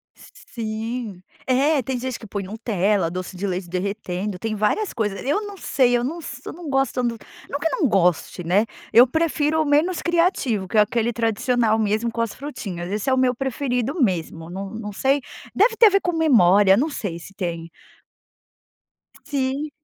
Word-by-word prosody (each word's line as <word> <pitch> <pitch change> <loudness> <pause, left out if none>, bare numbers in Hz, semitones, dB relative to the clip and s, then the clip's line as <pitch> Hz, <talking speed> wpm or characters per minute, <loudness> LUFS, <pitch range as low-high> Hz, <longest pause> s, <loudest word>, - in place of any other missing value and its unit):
Sim. 220 -2 -6 0.3
É, 275 +3 +3
tem 260 +1 -3
gente 255 -1 -4
que 220 - -11
põe 200 0 -4
Nutella, 200 -3 0
doce 185 +1 -6
de 200 - -2
leite 180 -1 -3
derretendo, 190 +1 -3
tem 215 +3 -3
várias 215 - 0
coisas. 210 -3 -2
Eu 295 +10 +1
não 405 -1 -9
sei 245 -8 +2
eu 240 - -2
não 310 +7 -3
s 250 -6 -8
eu - - -6
não 335 -2 -8
gosto 270 -2 +1
do 235 -2 -1 0.3
não 285 - -3
que 325 - +1
eu - - -2
não 290 - +4
goste, 180 -2 +1
né. 190 +6 +2 0.3
Eu 245 +3 +8
prefiro 315 +1 +1
o - - 0
menos 305 +5 +2
criativo, 335 - +1
que 215 - -2
é 210 - +8
aquele 235 +2 0
tradicional 225 0 +1
mesmo 220 +2 0
com 230 - -2
as 230 -2 -2
frutinhas. 195 -11 -6
Esse 210 +5 -1
é - - +3
o 260 - +2
meu 255 -1 +3
preferido 265 +2 -2
mesmo. 165 -6 -1
Não 195 +2 -5
não 215 0 -6
sei 270 +7 +1 0.3
deve 450 +3 +4
ter 455 - +8
a - - +7
ver 395 0 +2
com 355 - 0
memória. 205 - +5
Não 295 +6 +1
sei 200 - -4
se 190 - -12
tem. 170 -4 -4 1.5
Sim. 280 0 -2
230 Hz, 190 wpm, -22 LUFS, 200-275 Hz, 1.5 s, Eu